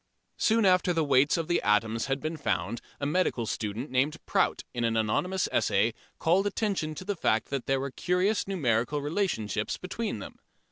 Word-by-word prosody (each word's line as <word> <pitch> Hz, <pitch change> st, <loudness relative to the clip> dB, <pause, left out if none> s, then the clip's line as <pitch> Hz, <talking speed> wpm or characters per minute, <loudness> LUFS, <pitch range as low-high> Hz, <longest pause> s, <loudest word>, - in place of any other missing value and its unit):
Soon 225 Hz, -1 st, +3 dB
after 180 Hz, -1 st, +4 dB
the 165 Hz, -1 st, +1 dB
weights 140 Hz, +2 st, +3 dB
of 165 Hz, -2 st, -2 dB
the 175 Hz, -, +1 dB
atoms 110 Hz, +3 st, +1 dB
had 135 Hz, 0 st, 0 dB
been 155 Hz, +3 st, -3 dB
found 115 Hz, -, -2 dB, 0.2 s
a 140 Hz, -, -2 dB
medical 145 Hz, -6 st, +1 dB
student 110 Hz, +5 st, -4 dB
named 140 Hz, +5 st, +1 dB
Prout -, -, +1 dB
in 120 Hz, -, -2 dB
an 115 Hz, -1 st, +1 dB
anonymous 180 Hz, -, 0 dB
essay 105 Hz, +4 st, +2 dB, 0.2 s
called 185 Hz, +5 st, +2 dB
attention 195 Hz, -8 st, -1 dB
to 185 Hz, -, -7 dB
the 205 Hz, 0 st, -1 dB
fact 110 Hz, -9 st, +1 dB
that 135 Hz, -3 st, -3 dB
there 135 Hz, 0 st, +2 dB
were 140 Hz, 0 st, -3 dB
curious 180 Hz, +9 st, 0 dB
numerical 140 Hz, -, 0 dB
relationships 145 Hz, -, -1 dB
between -, -, -4 dB
them. -, -, -9 dB
145 Hz, 180 wpm, -28 LUFS, 115-180 Hz, 0.2 s, after